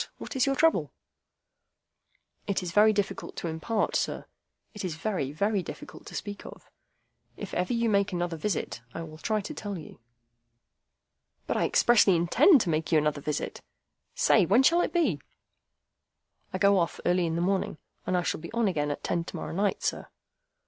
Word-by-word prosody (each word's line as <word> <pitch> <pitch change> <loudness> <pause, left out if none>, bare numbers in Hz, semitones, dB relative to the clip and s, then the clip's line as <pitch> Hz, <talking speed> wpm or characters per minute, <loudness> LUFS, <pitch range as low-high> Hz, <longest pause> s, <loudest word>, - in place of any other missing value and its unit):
What - - -8
is 265 +1 +2
your 275 - +2
trouble?" 325 +3 +2 1.6
"It 200 -2 -1
is 175 - -4
very 210 +4 +6
difficult 205 -2 -3
to - - -4
impart, 165 +7 -1
sir. - - -1 0.5
It 210 - -7
is 175 -4 -3
very, 165 -6 -2
very 200 +6 0
difficult 150 -3 -10
to - - -9
speak 205 -1 -6
of. - - -13 0.7
If - - -7
ever 180 +4 -1
you 235 -1 +1
make 200 -2 +2
me 180 - -2
another 175 -1 -2
visit, 165 - -3
I 165 - -4
will 155 -1 -10
try 215 +3 0
to 200 - -7
tell 205 -2 -5
you." 160 - -11 1.5
"But - - -2
I - - +2
expressly 210 -6 +4
intend 245 - +5
to 175 - 0
make 155 +2 -1
you 160 - +5
another 150 -1 0
visit. 150 +1 -3 0.5
Say, 215 - +4
when 210 +9 +4
shall 340 +5 +5
it - - -1
be?" 345 -2 +1 1.3
"I - - -2
go 200 -1 +4
off 170 - -1
early 175 -1 +2
in 165 - -2
the 170 - -1
morning, 190 -3 0 0.3
and 185 - +1
I 175 - 0
shall - - -2
be 170 - -8
on 230 -2 +2
again 150 -6 0
at 145 - -4
ten 170 - -1
to - - -8
morrow - - -5
night, 200 +3 0
sir." - - -2
190 Hz, 190 wpm, -28 LUFS, 165-215 Hz, 1.6 s, very